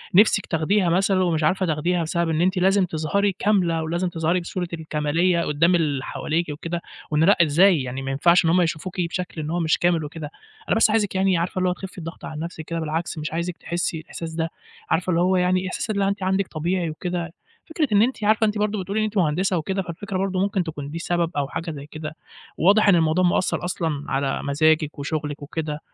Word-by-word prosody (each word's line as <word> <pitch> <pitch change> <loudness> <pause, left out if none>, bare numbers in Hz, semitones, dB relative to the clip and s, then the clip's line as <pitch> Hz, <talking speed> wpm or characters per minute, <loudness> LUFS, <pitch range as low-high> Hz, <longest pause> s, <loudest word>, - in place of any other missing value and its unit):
نفسِك 205 0 +5
تاخديها 175 +4 +1
مثلًا 185 +2 +2
ومش 165 -3 0
عارفة 185 +5 +2
تاخديها، 170 +2 0
بسبب 170 +1 -1
إن 160 0 +1
أنتِ 185 +2 +2
لازم 190 +1 +3
تظهري 180 +5 0
كاملة، 175 -6 +2
ولازم 170 +3 -1
تظهري 165 +1 0
بصورة 175 +1 -4
الكمالية 160 +2 0
قدّام 165 +3 +2
اللي 145 -6 0
حواليكِ 160 +4 -2
وكده، 165 +4 -4 0.3
وإن 150 +1 +3
لأ، 200 +5 +5
إزاي 170 +1 +5
يعني 130 +1 -5
ما 135 0 -3
ينفعش 170 +6 +4
إن 165 - +3
هم 180 +2 +4
يشوفوكِ 175 +2 -2
بشكل 175 -1 -3
إن 150 - -4
هو 175 - -1
مش 160 -1 +2
كامل 170 -3 +1
وكده، 150 0 -7 0.4
أنا - - +3
بس 225 - +5
عايزِك 210 -3 +1
يعني 190 -1 +3
عارفة 175 +2 -2
اللي 185 0 +2
هو - - +1
تخفي 190 +1 -9
الضغط 165 -1 -8
عن 155 - -6
نفسِك 165 -1 -6
كده، 170 +1 -3
بالعكس 160 +1 -3
مش 155 0 -4
عايزِك 170 +1 -3
تحسّي 170 -1 -2
الإحساس 160 +1 -7
ده، 165 0 -1 0.4
عارفة 175 +3 0
اللي 170 -1 +2
هو 185 +1 +3
يعني 185 +1 +1
إحساس 185 - -4
اللي 200 -2 +1
أنتِ 200 -1 -2
عندِك 190 +1 +1
طبيعي 170 +2 -1
وكده، 175 +1 -4 0.4
فكرة 320 -2 0
إن 205 -1 +5
أنتِ 235 -1 0
عارفة 215 +1 +3
أنتِ 210 0 -1
برضه 210 -1 0
بتقولي 200 +4 -2
إن 215 - +2
أنتِ 215 0 -4
مهندسة 180 +2 +1
وكده، 190 +5 -1
فالفكرة 185 +3 -5
برضه 190 0 -1
ممكن 195 -1 +1
تكون 150 -4 -6
دي 150 - -8
السبب 170 0 -1
أو 140 - 0
حاجة 165 +3 -4
زي 145 -2 -8
كده، 155 0 -7 0.4
واضح 205 +4 +4
إن 190 - +6
الموضوع 165 +2 +3
مأثّر 180 +1 +1
أصلًا 160 -5 -2
على 135 0 -1
مزاجِك 155 +1 +2
وشغلِك 150 0 -3
وكده، 150 0 -4
170 Hz, 215 wpm, -23 LUFS, 155-185 Hz, 0.4 s, إن